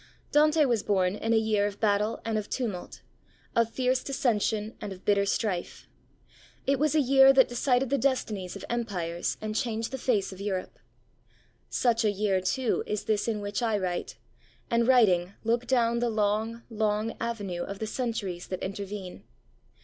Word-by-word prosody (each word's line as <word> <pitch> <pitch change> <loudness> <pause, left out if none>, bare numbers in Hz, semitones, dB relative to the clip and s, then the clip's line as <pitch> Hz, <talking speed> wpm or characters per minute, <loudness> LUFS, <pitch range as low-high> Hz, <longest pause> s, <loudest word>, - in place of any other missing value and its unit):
Dante 305 +1 +4
was 235 -5 +1
born 190 -3 +1
in 225 +2 -2
a 225 - +5
year 215 -2 +2
of 205 0 -7
battle 210 0 +1
and 225 -1 -1
of 215 -1 -2
tumult, 215 -9 -4 0.5
of 230 -1 +3
fierce 255 +1 0
dissension 220 -4 0
and 205 - -5
of 185 -1 -10
bitter 200 -1 +3
strife. 195 -4 -2 0.8
It 275 -1 +2
was 305 +1 +2
a - - +5
year 270 0 +7
that 265 -1 +6
decided 250 +1 +1
the 280 - +2
destinies 215 -9 -1
of 195 - -7
empires 180 -8 -2
and 215 0 -4
changed 225 -1 -1
the 265 - -4
face 210 -7 0
of 190 - -10
Europe. 190 -2 -4 0.9
Such 235 -2 +1
a 215 - +3
year, 200 -2 +1
too, 225 +7 0
is 210 -1 -2
this 215 0 0
in 215 -2 -1
which 205 +3 -3
I 225 -3 +1
write, 180 -3 -3 0.5
and, 235 0 +2
writing, 200 -8 +4
look 235 +2 0
down 235 -2 +2
the 240 0 +1
long, 220 +2 0
long 215 0 0
avenue 205 -7 -3
of 200 - -5
the 220 - -3
centuries 215 -7 -3
that 185 - -5
intervene. 195 -1 -6
220 Hz, 170 wpm, -28 LUFS, 200-240 Hz, 0.9 s, year